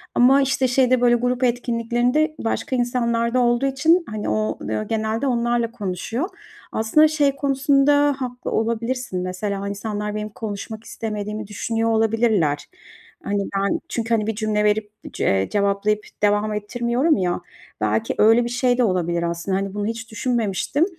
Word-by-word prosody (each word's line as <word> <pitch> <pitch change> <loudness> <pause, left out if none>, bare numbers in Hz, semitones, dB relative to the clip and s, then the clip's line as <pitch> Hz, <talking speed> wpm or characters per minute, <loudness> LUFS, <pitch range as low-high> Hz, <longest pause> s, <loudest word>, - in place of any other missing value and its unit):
ama, 265 +3 +6
işte, 265 -1 +1
şeyde 255 0 +3
böyle 240 -1 +5
grup 245 +1 0
etkinliklerinde 245 +5 +1
başka 260 +4 -2
insanlar 235 -1 0
da 255 - +3
olduğu 240 +1 +2
için, 315 +6 +3
hani, 215 -1 -3
o, 110 0 -1
ııı, 110 0 -3
genelde 220 +4 -1
onlarla 235 -2 0
konuşuyor. 225 - -3 0.4
Aslında 225 +8 +4
şey 290 -3 +1
konusunda 280 +1 +3
haklı 250 -1 -5
olabilirsin, 230 -2 -1
mesela, 195 +2 -3
o - - -3
insanlar 210 +1 -4
benim 210 0 -3
konuşmak 215 +1 -6
istemediğimi 210 -1 -5
düşünüyor 225 +2 -1
olabilirler. 220 -9 +2 0.6
Hani, 205 0 -1 0.2
ben 195 0 +1
çünkü, 230 0 -2
hani, 215 -2 +1
bir 225 - -1
cümle 210 -1 0
verip 210 0 +1 0.2
c - - -3
eee, 95 0 +2
cevaplayıp 205 +1 0 0.2
devam 210 +1 +2
ettirmiyorum 240 +8 0
ya, 180 -1 -1 0.4
belki 110 +1 0
öyle 225 +3 +5
bir 240 - -3
şey 245 0 +1
de 250 - +3
olabilir 175 -4 0
aslında, 170 +3 -1
hani, 195 0 -3
bunu 205 0 -2
hiç 225 +1 -5
düşünmemiştim. 225 - 0
225 Hz, 155 wpm, -22 LUFS, 205-245 Hz, 0.6 s, ama